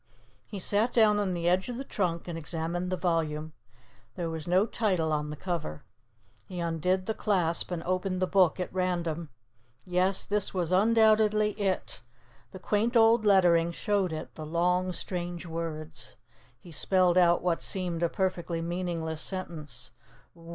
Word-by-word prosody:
He 205 - -7
sat 205 +5 +1
down 215 -3 +4
on 190 -3 -1
the 170 0 -2
edge 185 +5 +2
of 245 - -4
the 270 - -4
trunk 175 -10 -2
and 170 - -4
examined 165 +3 -3
the 185 - 0
volume. 160 -3 -1 0.6
There 170 -2 -3
was 160 0 -6
no 185 +4 +4
title 185 -9 0
on 150 0 -1
the 150 - -5
cover. 150 - -4 0.6
He 180 -2 -6
undid 170 +3 0
the 220 - -1
clasp 180 -7 0
and 175 -2 -4
opened 185 +1 -1
the 185 - +2
Book 185 -2 +3
at 180 - -4
random. 170 -3 -1 0.6
Yes, 185 +2 +2
this 205 -1 -2
was 175 -2 -1
undoubtedly 215 +1 +4
it. 200 -3 -2 0.5
The - - -8
quaint 215 +6 +1
old 225 0 +5
lettering 175 -4 +4
showed 200 -2 0
it, 155 0 -6
the 155 - -8
long 180 +3 +1
strange 175 0 -5
words. 155 -6 -6 0.4
He 175 - -14
spelled 180 +3 +2
out 175 -2 +4
what 175 -2 0
seemed 180 -3 -3
a 170 - +2
perfectly 180 -3 -2
meaningless 165 -2 -3
sentence. 160 -8 -6
180 Hz, 160 wpm, -29 LUFS, 165-190 Hz, 0.6 s, old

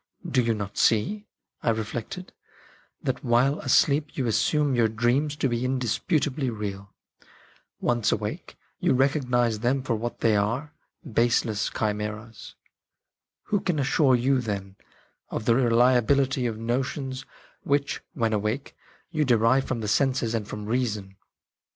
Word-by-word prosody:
" - - -25
Do - - +6
you 115 -1 +1
not 100 -1 -5
see," 205 - +2 0.3
I - - 0
reflected, 115 - -4 0.3
" - - -31
that - - -2
while 125 +5 +3
asleep 150 +2 +2
you 135 - 0
assume 145 +5 +2
your 120 -2 +3
dreams 120 +7 +1
to 145 - 0
be 120 -1 -1
indisputably 130 - 0
real? 100 -3 -6 0.8
Once 120 -3 +1
awake, 105 0 -4 0.2
you - - +2
recognise 125 -4 +1
them 130 +4 0
for 120 -3 0
what 120 +2 -5
they 110 -2 +3
are 115 +9 -1 0.2
— - - -14
baseless 115 -3 +1
chimeras. 105 +1 -4 0.9
Who 205 -1 0
can 180 -5 -1
assure 135 -1 +3
you, 130 +2 +2
then, 100 -4 -4 0.5
of - - -4
the 115 - +4
reliability 125 +2 +3
of 110 -2 -4
notions 130 +3 -2 0.4
which, 140 0 0
when 115 -4 0
awake, 110 +6 -2 0.4
you 155 -3 +1
derive 125 +1 +3
from 120 -3 -3
the 105 - -3
senses 125 0 +1
and 110 -3 -2
from 105 0 -6
reason 105 -4 -2
120 Hz, 145 wpm, -26 LUFS, 110-135 Hz, 0.9 s, Do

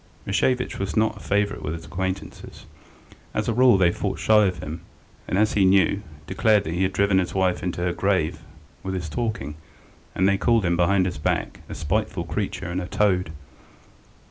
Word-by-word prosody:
Rashevitch 125 +5 0
was 95 -5 -3
not 110 0 +2
a - - -10
favourite 100 0 0
with 80 - -3
his 80 -1 -9
acquaintances; 95 +2 -5 0.7
as - - -1
a 115 - +1
rule 125 -2 +5
they 90 -2 +4
fought - - -3
shy 105 -2 +4
of 90 -1 -2
him, 80 -1 -7 0.5
and, 95 - -1
as 110 +1 +2
he 100 - +3
knew, 95 +1 +3 0.2
declared 105 +6 +2
that 80 - -4
he 90 - -1
had 95 0 +2
driven 100 0 +2
his 90 - -2
wife 95 -2 +1
into 90 0 -3
her 90 0 0
grave 95 -6 0 0.4
with 95 0 -4
his 90 -3 -3
talking, 80 - -3 0.6
and 95 - +3
they 100 0 +2
called 115 -4 +2
him, 85 0 +2
behind 90 +2 +3
his 90 -5 -3
back, - - -1
a - - -6
spiteful 95 +2 -1
creature 95 +3 -3
and 90 +2 -2
a 90 - -5
toad. 90 -5 +1
95 Hz, 195 wpm, -24 LUFS, 85-100 Hz, 0.7 s, rule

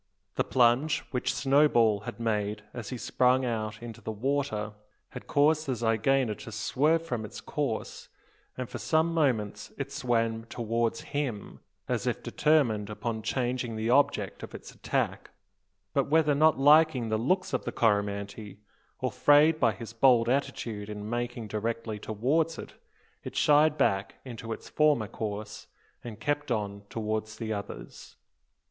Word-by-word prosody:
The - - +1
plunge 125 +5 +3
which 125 -2 0
Snowball 135 -7 +3
had - - -10
made 105 -2 -1
as 120 -4 -6
he 125 - -4
sprang 125 +2 +2
out 110 -1 -3
into 115 -2 -8
the - - -6
water 110 -2 -2 0.4
had - - -10
caused 155 +2 +3
the 130 - +1
zygaena 115 +2 +1
to 110 - -9
swerve 150 +10 +1
from 120 -8 -3
its 105 - -8
course; - - -4 0.5
and 130 -1 -3
for - - -7
some 160 +1 +1
moments 125 -10 0
it 135 0 -4
swam 115 -3 0
towards 115 0 -1
him, 130 -8 -4 0.3
as - - -1
if - - -2
determined 120 -10 +2
upon 110 +1 -4
changing 125 0 -2
the 110 +2 -1
object 140 +3 +2
of - - -8
its - - -10
attack; - - -2 0.6
but - - +1
whether 155 -1 +4
not 155 +2 +4
liking 145 -3 +5
the 110 0 0
looks 185 - 0
of 130 - 0
the - - -3
Coromantee 100 -1 -1 0.4
or - - 0
frayed 150 +2 +5
by 115 -5 +4
his 115 +3 -9
bold 115 -1 +4
attitude 120 -5 -2
in 105 0 -6
making 120 -1 -3
directly 110 +1 -3
towards 145 +11 0
it, - - -9 0.5
it - - -7
shied 150 +1 +4
back 95 -3 +1
into 115 -2 -7
its - - -6
former 150 -8 +2
course, 105 -1 -6 0.4
and 110 -3 -8
kept 145 +4 -1
on 100 -3 -2
towards 110 -1 -3
the 110 -2 -3
others. 100 -1 -8
120 Hz, 155 wpm, -28 LUFS, 110-140 Hz, 0.6 s, liking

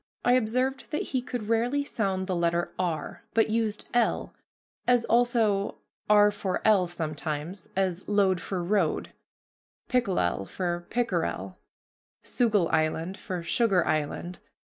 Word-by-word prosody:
I 245 - +5
observed 255 +3 0
that 300 - -1
he 260 - +2
could 240 -3 -5
rarely 240 +5 +1
sound 195 -8 -1
the 185 -1 -1
letter 170 0 0
r, 175 -4 -2
but 225 -1 +3
used 220 -2 -1
l, 240 -2 +1 0.5
as 245 -2 +4
also 230 -4 +2 0.3
r 210 0 +6
for 200 -2 -2
l 200 -4 +5
sometimes; 160 +1 -4
as 190 -1 -1
load 195 -3 +3
for 185 -3 -3
road, 185 -3 0 0.8
pickelel 185 - +1
for 175 -2 -3
pickerel, 240 0 -1 0.6
Soogle 215 -8 +2
Island 160 +4 0
for 180 -3 -4
Sugar 190 -1 +2
Island. 155 +4 -2
195 Hz, 125 wpm, -27 LUFS, 175-230 Hz, 0.8 s, r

